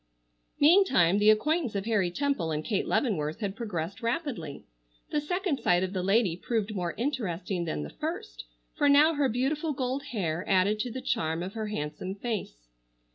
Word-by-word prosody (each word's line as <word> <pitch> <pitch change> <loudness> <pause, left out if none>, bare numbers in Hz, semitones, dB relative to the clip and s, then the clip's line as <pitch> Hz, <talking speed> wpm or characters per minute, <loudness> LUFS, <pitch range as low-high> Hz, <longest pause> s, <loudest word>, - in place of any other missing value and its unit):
Meantime, 285 - +5
the 210 +1 +5
acquaintance 275 +3 +2
of 195 0 -2
Harry 210 -6 +2
Temple 235 - -1
and 155 0 -2
Kate 205 -5 -1
Leavenworth 160 - 0
had 200 -3 -3
progressed 200 -5 -4
rapidly. 230 - -3 0.5
The 295 - +1
second 355 -1 -1
sight 180 +1 +3
of 185 +1 -3
the 185 - -1
lady 195 -1 +2
proved 215 +2 -2
more 175 -4 -3
interesting 200 - -2
than 75 - -3
the 75 - -7
first, - - -5 0.3
for 290 - +3
now 295 +3 +6
her 285 -3 +1
beautiful 290 +6 0
gold 260 +1 -2
hair 175 -6 -2
added 200 +3 +3
to 245 +3 -2
the 260 +3 -5
charm 170 -11 -1
of 190 +2 -6
her 220 -1 -3
handsome 185 0 -4
face. 200 - -5
210 Hz, 175 wpm, -28 LUFS, 175-265 Hz, 0.5 s, now